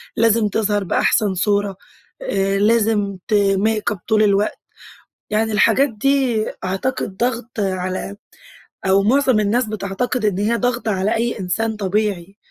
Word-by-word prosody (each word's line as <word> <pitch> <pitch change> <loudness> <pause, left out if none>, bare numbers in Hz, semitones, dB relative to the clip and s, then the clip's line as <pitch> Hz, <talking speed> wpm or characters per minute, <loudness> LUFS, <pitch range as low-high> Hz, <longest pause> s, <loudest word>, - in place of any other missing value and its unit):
لازم 230 -1 +3
تظهر 205 0 0
بأحسن 200 +2 +1
صورة 200 0 0 0.4
آآ، 195 - 0
لازم 210 -2 +2
ت 220 - -2 0.2
make 215 0 0
up 185 - -16
طول 215 -1 +3
الوقت، 205 0 +1 0.7
يعني 220 +1 0
الحاجات 270 +6 +3
دي 245 0 +1 0.2
أعتقد 190 +1 -3
ضغط 240 0 -2
على 185 +1 -3 0.7
أو 195 +1 +4
معظم 260 +1 +3
الناس 220 +4 +1
بتعتقد 215 +3 -3
إن 200 -3 +1
هي 220 +3 +1
ضغط 245 -1 -1
على 200 +2 0
أي 235 +1 -1
إنسان 220 +5 -2
طبيعي. 200 -2 -2
210 Hz, 135 wpm, -19 LUFS, 195-230 Hz, 0.7 s, أو